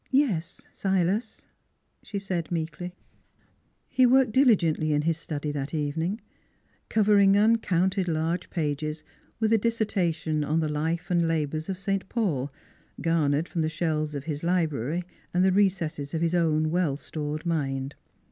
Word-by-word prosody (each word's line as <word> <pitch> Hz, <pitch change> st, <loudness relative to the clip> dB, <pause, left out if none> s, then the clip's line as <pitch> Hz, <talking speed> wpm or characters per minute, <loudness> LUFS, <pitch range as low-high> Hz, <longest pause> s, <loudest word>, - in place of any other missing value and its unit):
' -, -, -35 dB, 0.2 s
Yes, 170 Hz, -, -4 dB
Silas," 195 Hz, +4 st, -1 dB, 0.6 s
she 205 Hz, -, -6 dB
said 185 Hz, -4 st, -3 dB
meekly. 170 Hz, +2 st, -4 dB, 0.9 s
He 255 Hz, 0 st, +4 dB
worked 260 Hz, -1 st, +4 dB
diligently 175 Hz, -, +3 dB
in 150 Hz, 0 st, +1 dB
his 165 Hz, 0 st, 0 dB
study 150 Hz, -2 st, -4 dB
that 145 Hz, +1 st, -4 dB
evening, 160 Hz, +7 st, -1 dB, 0.7 s
covering 200 Hz, -2 st, +5 dB
uncounted 195 Hz, -4 st, +2 dB
large 165 Hz, +1 st, -1 dB
pages 155 Hz, -1 st, -2 dB, 0.4 s
with 220 Hz, 0 st, +2 dB
a 225 Hz, -, +5 dB
dissertation 190 Hz, -9 st, 0 dB
on 155 Hz, +3 st, +1 dB
the 160 Hz, -, 0 dB
life 165 Hz, +4 st, -2 dB
and 170 Hz, -1 st, +3 dB
labors 155 Hz, 0 st, -1 dB
of 190 Hz, -, -2 dB
Saint 195 Hz, 0 st, -2 dB
Paul, 150 Hz, -, -1 dB, 0.5 s
garnered 160 Hz, -1 st, +1 dB
from 170 Hz, -, -2 dB
the 155 Hz, -, +1 dB
shelves 155 Hz, -2 st, -1 dB
of 140 Hz, -, -4 dB
his 150 Hz, -1 st, -4 dB
library 165 Hz, -3 st, 0 dB, 0.3 s
and 180 Hz, +1 st, +4 dB
the 190 Hz, -, +4 dB
recesses 175 Hz, -7 st, 0 dB
of 160 Hz, -, -1 dB
his 170 Hz, 0 st, +1 dB
own 155 Hz, -2 st, +2 dB
well 165 Hz, -5 st, +1 dB
stored 150 Hz, +1 st, -5 dB
mind. 135 Hz, -4 st, -1 dB
165 Hz, 145 wpm, -27 LUFS, 155-190 Hz, 0.9 s, covering